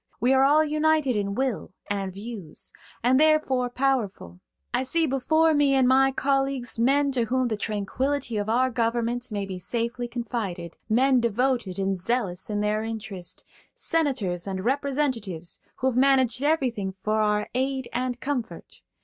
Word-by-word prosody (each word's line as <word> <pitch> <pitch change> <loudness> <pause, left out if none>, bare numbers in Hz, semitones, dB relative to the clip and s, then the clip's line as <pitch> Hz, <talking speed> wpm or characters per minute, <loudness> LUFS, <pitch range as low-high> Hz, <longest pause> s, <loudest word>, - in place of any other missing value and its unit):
We 250 +3 +3
are 265 0 +5
all 295 +3 +5
united 305 -3 +2
in 200 -1 -1
will 260 -6 -2
and 195 -2 -2
views, 200 -4 -8 0.3
and 255 +2 +4
therefore 305 -5 +3
powerful. 240 - -1 0.3
I 245 - +2
see 325 +5 +1
before 315 +4 +2
me 290 -2 +3
in 265 -1 +4
my 265 +1 +5
colleagues 270 -3 0
men 280 +4 +3
to 245 -3 +1
whom 255 +1 0
the 220 - 0
tranquility 230 +5 -2
of 205 +1 -2
our 255 +3 +2
government 235 +1 -1
may 200 -1 -2
be 190 -2 -6
safely 235 +5 -3
confided–men 235 - -1
devoted 235 -3 0
and 195 0 0
zealous 190 -2 -2
in 205 -1 -1
their 210 +1 0
interest–senators 220 - -3
and 190 0 -4
representatives 260 - -1 0.2
who 260 - -1
have - - -7
managed 260 -2 +3
everything 250 -11 0
for 215 +1 +1
our 210 0 +1
aid 265 0 -1
and 250 0 -2
comfort. 260 -4 -5
245 Hz, 150 wpm, -25 LUFS, 210-270 Hz, 0.3 s, are